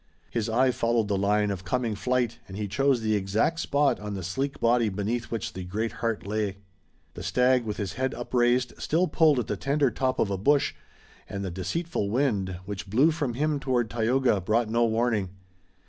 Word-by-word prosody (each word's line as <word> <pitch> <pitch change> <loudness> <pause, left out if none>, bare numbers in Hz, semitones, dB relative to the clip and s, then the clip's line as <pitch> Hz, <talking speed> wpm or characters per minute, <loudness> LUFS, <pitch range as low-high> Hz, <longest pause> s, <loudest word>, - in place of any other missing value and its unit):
His 115 -2 -1
eye 130 +3 +3
followed 115 -3 0
the 100 - +1
line 105 +1 +2
of 95 -2 -5
coming 115 +4 -1
flight 125 +2 -1
and 95 0 -8
he 105 -1 -2
chose 135 +3 +2
the 110 -1 +1
exact 105 +12 0
spot 145 -2 +2
on 105 -1 -5
the 95 - -5
sleek 135 +11 -3
body 115 -1 +3
beneath 105 +5 -2
which 115 -3 -4
the 95 - -6
great 110 +5 -2
heart 115 -3 -1
lay. 105 -1 -2 0.6
The - - -8
stag, 125 -1 +2
with 105 -1 -3
his 100 -3 -3
head 130 0 -2
upraised, 120 0 +1
still 175 +4 +2
pulled 155 -5 +4
at 120 - 0
the 105 - -2
tender 140 +2 +1
top 130 +3 -1
of 100 - +1
a 95 - -2
bush, 140 +7 +3 0.6
and 100 0 -4
the 95 - -3
deceitful 100 - -2
wind, 105 -7 0
which 100 0 -6
blew 135 +11 +4
from 145 -7 -2
him 150 +2 0
toward 125 -5 0
Tayoga, 120 -2 +2
brought 110 +4 +1
no 120 +1 +3
warning. 110 -4 0
115 Hz, 195 wpm, -27 LUFS, 105-130 Hz, 0.6 s, pulled